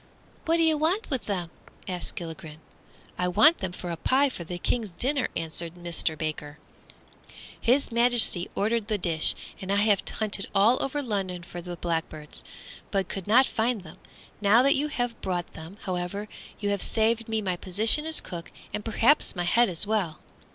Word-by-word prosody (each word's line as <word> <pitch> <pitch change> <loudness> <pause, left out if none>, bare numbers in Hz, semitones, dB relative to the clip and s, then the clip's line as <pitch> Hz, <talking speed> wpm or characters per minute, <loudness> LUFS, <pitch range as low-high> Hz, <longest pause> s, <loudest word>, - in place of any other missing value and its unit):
"What 330 +1 +2
do 330 - +3
you 315 -2 +3
want 355 +7 0
with 260 -3 -2
them?" 180 -5 -3 0.4
asked 180 -2 -5
Gilligren. 160 -2 -8 0.6
"I 180 - +1
want 305 - +5
them 190 -2 -3
for 180 0 -6
a - - -2
pie 270 - +2
for 185 - -8
the 175 +2 -6
King's 220 +4 -1
dinner," 265 - 0
answered 165 +1 -3
Mister 170 -2 -1
Baker; 150 -1 -4 1.0
"His 255 +3 +2
Majesty 235 -6 +5
ordered 220 +1 0
the 215 -2 0
dish, 165 -4 +1 0.3
and 190 0 -4
I - - +2
have 205 -1 +3
hunted 210 -2 0
all 215 +6 +4
over 285 +2 -2
London 190 -6 -3
for 175 0 -8
the 175 0 -7
blackbirds, 165 -3 -4 0.5
but 195 -2 -1
could 195 -2 -5
not 245 +5 +6
find 225 -4 -1
them. 175 +2 -13 0.4
Now 215 +4 +5
that 275 - +5
you 290 +2 0
have 245 -5 -3
brought 180 -2 -3
them, 160 +5 -10
however, 185 +3 -3 0.3
you 205 - -1
have 200 -1 -1
saved 225 0 +1
me 220 0 0
my 190 -4 -1
position 215 - +4
as 320 - +2
cook, 170 -1 -8 0.2
and 210 - -3
perhaps 230 +5 +2
my 175 - -2
head 235 +6 +3
as 175 +2 +1
well." 200 -7 -1
200 Hz, 180 wpm, -26 LUFS, 175-235 Hz, 1.0 s, not